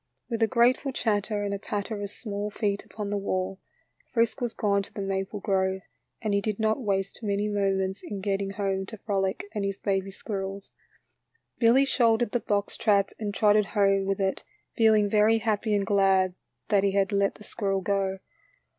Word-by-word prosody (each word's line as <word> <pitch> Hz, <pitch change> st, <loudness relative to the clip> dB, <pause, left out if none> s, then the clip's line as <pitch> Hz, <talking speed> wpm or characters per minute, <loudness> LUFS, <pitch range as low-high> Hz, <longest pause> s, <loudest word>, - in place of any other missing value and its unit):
With 230 Hz, 0 st, -1 dB
a 225 Hz, -, +5 dB
grate 240 Hz, +2 st, +4 dB
ful 275 Hz, -, -3 dB
chatter 210 Hz, -3 st, 0 dB
and 200 Hz, 0 st, -2 dB
a 200 Hz, -, -3 dB
patter 205 Hz, +1 st, -3 dB
of 200 Hz, -, -4 dB
small 205 Hz, -1 st, -5 dB
feet 205 Hz, -1 st, -1 dB
upon 210 Hz, -2 st, -6 dB
the 205 Hz, -, 0 dB
wall, 190 Hz, -1 st, -2 dB, 0.5 s
Frisk 230 Hz, -2 st, +1 dB
was 240 Hz, -2 st, -2 dB
gone 200 Hz, -1 st, +2 dB
to 195 Hz, -, -9 dB
the -, -, -8 dB
maple 195 Hz, +1 st, -2 dB
grove, 190 Hz, -1 st, 0 dB, 0.4 s
and 215 Hz, -2 st, 0 dB
he 200 Hz, -, +2 dB
did 210 Hz, 0 st, -2 dB
not 220 Hz, +4 st, +1 dB
waste 195 Hz, -3 st, -1 dB
many 205 Hz, -1 st, 0 dB
moments 195 Hz, -2 st, 0 dB
in 200 Hz, -, -6 dB
getting 195 Hz, 0 st, -1 dB
home 195 Hz, -1 st, -2 dB
to 220 Hz, -, -8 dB
Frolic 195 Hz, -2 st, -1 dB
and 210 Hz, -3 st, -2 dB
his 195 Hz, 0 st, -2 dB
baby 195 Hz, -1 st, -1 dB
squirrels. 195 Hz, -1 st, -5 dB, 0.9 s
Billy 245 Hz, +4 st, +5 dB
shouldered 235 Hz, -4 st, +2 dB
the 245 Hz, -, +1 dB
box 205 Hz, -2 st, -1 dB
trap 200 Hz, -3 st, +2 dB
and 210 Hz, -2 st, -2 dB
trotted 210 Hz, 0 st, +4 dB
home 195 Hz, -1 st, +3 dB
with 195 Hz, 0 st, 0 dB
it, 190 Hz, -1 st, -1 dB, 0.3 s
feeling 220 Hz, -2 st, +4 dB
very 215 Hz, +2 st, +4 dB
happy 215 Hz, -1 st, 0 dB
and 200 Hz, -1 st, +1 dB
glad 195 Hz, -2 st, +3 dB, 0.4 s
that 200 Hz, -3 st, +3 dB
he 200 Hz, -1 st, +2 dB
had 195 Hz, 0 st, +2 dB
let 200 Hz, 0 st, +1 dB
the 210 Hz, -, -13 dB
squirrel 195 Hz, -2 st, -2 dB
go. 195 Hz, 0 st, 0 dB
200 Hz, 190 wpm, -27 LUFS, 195-215 Hz, 0.9 s, a